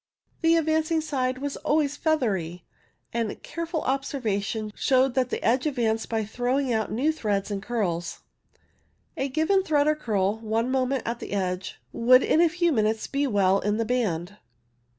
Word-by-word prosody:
The 330 Hz, 0 st, +4 dB
advancing 315 Hz, 0 st, +1 dB
side 260 Hz, -5 st, -1 dB
was 280 Hz, +1 st, -4 dB
always 295 Hz, -1 st, +1 dB
feathery, 200 Hz, -, -1 dB, 0.5 s
and 230 Hz, -2 st, -2 dB
careful 335 Hz, -1 st, -4 dB
observation 220 Hz, -6 st, -2 dB
showed 260 Hz, -1 st, +2 dB
that 255 Hz, -1 st, +1 dB
the -, -, -3 dB
edge 255 Hz, +5 st, +2 dB
ad 290 Hz, -, -2 dB
vanced 225 Hz, -2 st, 0 dB
by 225 Hz, -2 st, -1 dB
throwing 245 Hz, +4 st, -1 dB
out 220 Hz, -1 st, -1 dB
new 265 Hz, +8 st, +1 dB
threads 210 Hz, -9 st, -2 dB
and 200 Hz, -1 st, -3 dB
curls. 190 Hz, -7 st, -2 dB, 0.9 s
A 270 Hz, -, -2 dB
given 320 Hz, +8 st, +2 dB
thread 300 Hz, -6 st, +2 dB
or 305 Hz, -, +4 dB
curl, 215 Hz, -7 st, -1 dB
one 225 Hz, +3 st, -1 dB
moment 260 Hz, 0 st, 0 dB
at 235 Hz, +1 st, -3 dB
the -, -, -7 dB
edge, 185 Hz, -2 st, -3 dB
would 255 Hz, +2 st, +5 dB
in 320 Hz, -, +3 dB
a 340 Hz, -, +5 dB
few 345 Hz, 0 st, +1 dB
minutes 220 Hz, -4 st, +1 dB
be 280 Hz, +1 st, -1 dB
well 195 Hz, -4 st, +3 dB
in 210 Hz, +1 st, 0 dB
the 230 Hz, -, 0 dB
band. 205 Hz, -6 st, -1 dB
245 Hz, 170 wpm, -26 LUFS, 215-290 Hz, 0.9 s, would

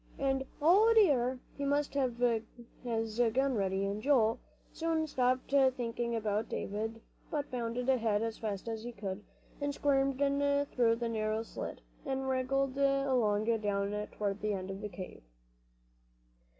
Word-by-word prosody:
and, 270 Hz, -1 st, 0 dB, 0.2 s
O 400 Hz, +8 st, +6 dB
dear! 260 Hz, -, +4 dB, 0.2 s
he 285 Hz, -, -4 dB
must 285 Hz, +1 st, +1 dB
have 260 Hz, -4 st, 0 dB, 0.7 s
his 225 Hz, -1 st, -1 dB
gun 270 Hz, 0 st, +2 dB
ready. 195 Hz, -2 st, 0 dB
And 200 Hz, +2 st, -2 dB
Joel 230 Hz, -4 st, +3 dB, 0.3 s
soon 325 Hz, -1 st, 0 dB
stopped 255 Hz, -3 st, 0 dB
thinking 240 Hz, -3 st, +1 dB
about 215 Hz, -1 st, -1 dB
David, 220 Hz, +2 st, -3 dB, 0.3 s
but 290 Hz, -1 st, -3 dB
bounded 245 Hz, 0 st, -2 dB
ahead 225 Hz, -5 st, +2 dB
as 225 Hz, -1 st, -3 dB
fast 210 Hz, -2 st, -4 dB
as 225 Hz, -1 st, -3 dB
he 240 Hz, +2 st, -6 dB
could, 200 Hz, -1 st, -5 dB, 0.4 s
and 285 Hz, 0 st, -1 dB
squirmed 275 Hz, -2 st, +2 dB
in 285 Hz, 0 st, +2 dB
through 235 Hz, -4 st, +2 dB
the 235 Hz, 0 st, -2 dB
narrow 220 Hz, -1 st, -1 dB
slit, -, -, -6 dB, 0.2 s
and 265 Hz, -1 st, -2 dB
wriggled 265 Hz, +1 st, 0 dB
along 265 Hz, -7 st, +2 dB, 0.2 s
down 205 Hz, 0 st, -1 dB
toward 205 Hz, -1 st, -2 dB
the 210 Hz, 0 st, 0 dB
end 190 Hz, 0 st, -4 dB
of 195 Hz, +1 st, -7 dB
the 210 Hz, -, -4 dB
cave. 185 Hz, -1 st, -8 dB
240 Hz, 150 wpm, -32 LUFS, 215-275 Hz, 0.7 s, O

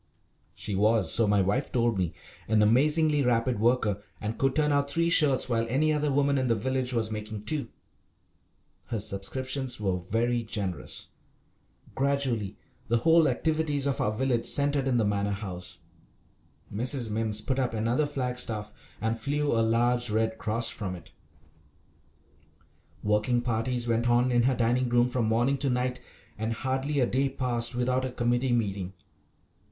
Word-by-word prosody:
She 105 Hz, -, -5 dB
was, 105 Hz, -2 st, +2 dB
so 115 Hz, -2 st, +3 dB
my 100 Hz, -1 st, +3 dB
wife 105 Hz, +9 st, -1 dB
told 120 Hz, -4 st, +1 dB
me, 90 Hz, -3 st, -1 dB, 0.3 s
an 110 Hz, -1 st, +3 dB
amazingly 150 Hz, +6 st, +3 dB
rapid 120 Hz, -2 st, +1 dB
worker, 110 Hz, -3 st, +1 dB, 0.2 s
and 110 Hz, +1 st, -4 dB
could 135 Hz, -1 st, +1 dB
turn 150 Hz, -1 st, +2 dB
out 140 Hz, 0 st, +1 dB
three 170 Hz, +3 st, +1 dB
shirts 140 Hz, -6 st, +4 dB
while 115 Hz, -2 st, 0 dB
any 155 Hz, +5 st, +2 dB
other 150 Hz, -1 st, 0 dB
woman 140 Hz, 0 st, +2 dB
in 130 Hz, -, 0 dB
the 115 Hz, -, +2 dB
village 130 Hz, +3 st, -1 dB
was 115 Hz, -3 st, -1 dB
making 105 Hz, -1 st, -6 dB
two. 140 Hz, +1 st, -2 dB, 1.2 s
Her 115 Hz, -, -3 dB
subscriptions 125 Hz, +6 st, -3 dB
were 95 Hz, -3 st, 0 dB
very 115 Hz, +6 st, 0 dB
generous. 100 Hz, -5 st, -4 dB, 0.8 s
Gradually 130 Hz, -7 st, 0 dB, 0.3 s
the 120 Hz, -, +2 dB
whole 160 Hz, +5 st, +4 dB
activities 150 Hz, +1 st, 0 dB
of 140 Hz, -4 st, -1 dB
our 105 Hz, -, +1 dB
village 120 Hz, +1 st, 0 dB
centred 140 Hz, -1 st, +2 dB
in 125 Hz, -2 st, +2 dB
the 115 Hz, -, +2 dB
Manor 100 Hz, 0 st, 0 dB
House. 90 Hz, -3 st, -5 dB, 1.0 s
Mrs. 120 Hz, +1 st, +2 dB
Mimms 110 Hz, -1 st, 0 dB
put 130 Hz, +5 st, -2 dB
up 125 Hz, -3 st, -1 dB
another 120 Hz, +7 st, 0 dB
flag 125 Hz, -3 st, -3 dB
staff 105 Hz, -3 st, -2 dB, 0.3 s
and 115 Hz, +1 st, -1 dB
flew 145 Hz, +4 st, -1 dB
a 115 Hz, -, +2 dB
large 120 Hz, +2 st, +2 dB
Red 110 Hz, +1 st, 0 dB
Cross 115 Hz, +2 st, +1 dB
from 95 Hz, -4 st, -5 dB
it. 90 Hz, -, -13 dB, 1.9 s
Working 105 Hz, +4 st, +1 dB
parties 120 Hz, +1 st, -1 dB
went 115 Hz, +1 st, +1 dB
on 120 Hz, +1 st, +3 dB
in 120 Hz, -1 st, +3 dB
her 130 Hz, +2 st, +2 dB
dining 120 Hz, +2 st, +1 dB
room 120 Hz, 0 st, +3 dB
from 125 Hz, -2 st, -1 dB
morning 120 Hz, +5 st, +1 dB
to 140 Hz, 0 st, +1 dB
night, 125 Hz, 0 st, -1 dB, 0.4 s
and 110 Hz, +1 st, -1 dB
hardly 135 Hz, +4 st, -2 dB
a 125 Hz, -, +4 dB
day 135 Hz, +3 st, 0 dB
passed 120 Hz, -2 st, -1 dB
without 125 Hz, +1 st, 0 dB
a 130 Hz, -, -3 dB
committee 120 Hz, +1 st, 0 dB
meeting. 100 Hz, -5 st, -1 dB
120 Hz, 160 wpm, -27 LUFS, 110-130 Hz, 1.9 s, shirts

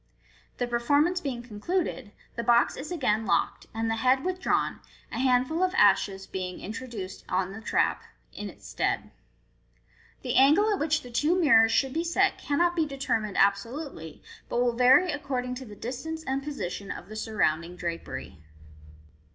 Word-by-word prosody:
The 245 Hz, -, 0 dB
per 240 Hz, 0 st, -1 dB
formance 295 Hz, +9 st, +2 dB
being 255 Hz, -6 st, -4 dB
concluded, 250 Hz, -, -3 dB, 0.2 s
the 235 Hz, -, -2 dB
box 235 Hz, +1 st, +3 dB
is 290 Hz, +6 st, -7 dB
agaiu 225 Hz, -, 0 dB
locked, -, -, 0 dB
and 225 Hz, +1 st, -2 dB
the 225 Hz, 0 st, 0 dB
head 260 Hz, +4 st, +2 dB
withdrawn, 370 Hz, 0 st, 0 dB, 0.3 s
a 230 Hz, -, -4 dB
handful 260 Hz, +5 st, +2 dB
of 370 Hz, 0 st, +1 dB
ashes 195 Hz, -1 st, +3 dB
b, 185 Hz, -1 st, -4 dB
ing 180 Hz, -, -9 dB
introduced 215 Hz, -3 st, -7 dB
on 185 Hz, 0 st, 0 dB
the 220 Hz, +3 st, -8 dB
trap -, -, +1 dB, 0.3 s
in -, -, -6 dB
its -, -, -14 dB
stead. -, -, -1 dB, 1.1 s
The 250 Hz, -2 st, -2 dB
angle 320 Hz, +11 st, +5 dB
at 400 Hz, -, -2 dB
which 310 Hz, 0 st, +1 dB
the 245 Hz, -, -10 dB
two 305 Hz, +9 st, +2 dB
mirrors 225 Hz, -9 st, +6 dB
should 265 Hz, +3 st, +1 dB
be 330 Hz, -, 0 dB
set 380 Hz, +3 st, +1 dB
cannot 345 Hz, +5 st, +1 dB
be 320 Hz, -2 st, +1 dB
determined 230 Hz, -7 st, -2 dB
absolutely, 200 Hz, -, -1 dB, 0.3 s
but 240 Hz, -, 0 dB
will 245 Hz, -1 st, +2 dB
vary 260 Hz, +9 st, +5 dB
according 265 Hz, -4 st, -3 dB
to 260 Hz, +1 st, -7 dB
the 210 Hz, -3 st, -11 dB
distance 315 Hz, +9 st, -5 dB
and 270 Hz, -1 st, -2 dB
position 205 Hz, -9 st, -5 dB
of -, -, -6 dB
the 215 Hz, -, -9 dB
surrounding 175 Hz, -6 st, -1 dB
drapery. 170 Hz, -, -6 dB
250 Hz, 165 wpm, -27 LUFS, 215-300 Hz, 1.1 s, mirrors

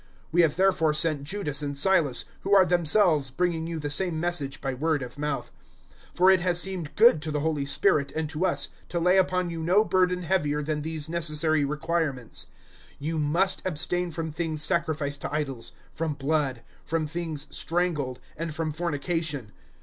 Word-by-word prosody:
015:027 -, -, -30 dB, 0.2 s
We 175 Hz, +2 st, +4 dB
have 160 Hz, -4 st, +3 dB
therefore 180 Hz, -5 st, +3 dB
sent 155 Hz, -2 st, +2 dB
Judas 150 Hz, -5 st, -2 dB
and 140 Hz, -1 st, -3 dB
Silas, 155 Hz, -5 st, +2 dB
who 200 Hz, +1 st, +2 dB
are 190 Hz, -1 st, +7 dB
themselves 170 Hz, -4 st, +3 dB
bringing 165 Hz, +3 st, -1 dB
you 165 Hz, -1 st, -4 dB
the 145 Hz, -2 st, -3 dB
same 170 Hz, 0 st, 0 dB
message 160 Hz, -5 st, -1 dB
by 135 Hz, -1 st, -3 dB
word 150 Hz, +1 st, 0 dB
of 125 Hz, +3 st, -9 dB
mouth. 150 Hz, 0 st, -3 dB, 0.6 s
015:028 -, -, -17 dB
For 185 Hz, +2 st, +6 dB
it 185 Hz, -2 st, +4 dB
has 175 Hz, -1 st, +2 dB
seemed 175 Hz, -5 st, -3 dB
good 220 Hz, -8 st, +6 dB
to 160 Hz, -, -3 dB
the 150 Hz, -1 st, -1 dB
Holy 150 Hz, -3 st, -1 dB
Spirit 140 Hz, 0 st, +3 dB
and 160 Hz, 0 st, -1 dB
to 170 Hz, +4 st, 0 dB
us -, -, 0 dB, 0.2 s
to 175 Hz, -, -1 dB
lay 180 Hz, +3 st, +4 dB
upon 180 Hz, -1 st, +1 dB
you 165 Hz, -, -5 dB
no 185 Hz, +6 st, +4 dB
burden 180 Hz, -2 st, +2 dB
heavier 150 Hz, -5 st, 0 dB
than 150 Hz, 0 st, -2 dB
these 155 Hz, -1 st, -4 dB
necessary 155 Hz, -2 st, +1 dB
requirements 150 Hz, -3 st, -2 dB, 0.5 s
015:029 -, -, -27 dB
You 155 Hz, +3 st, -2 dB
must 170 Hz, +6 st, +1 dB
abstain 175 Hz, +1 st, -1 dB
from 160 Hz, -1 st, -4 dB
things 155 Hz, -1 st, -2 dB
sacrificed 155 Hz, -5 st, -1 dB
to -, -, -4 dB
idols, 140 Hz, -6 st, -3 dB, 0.2 s
from 160 Hz, -2 st, -2 dB
blood, 140 Hz, -3 st, -1 dB, 0.2 s
from 160 Hz, -1 st, -1 dB
things 160 Hz, -2 st, -4 dB
strangled, 160 Hz, -7 st, -1 dB, 0.2 s
and 165 Hz, -1 st, -4 dB
from 160 Hz, -1 st, -1 dB
fornication. 150 Hz, -, -2 dB
160 Hz, 185 wpm, -26 LUFS, 145-175 Hz, 0.6 s, are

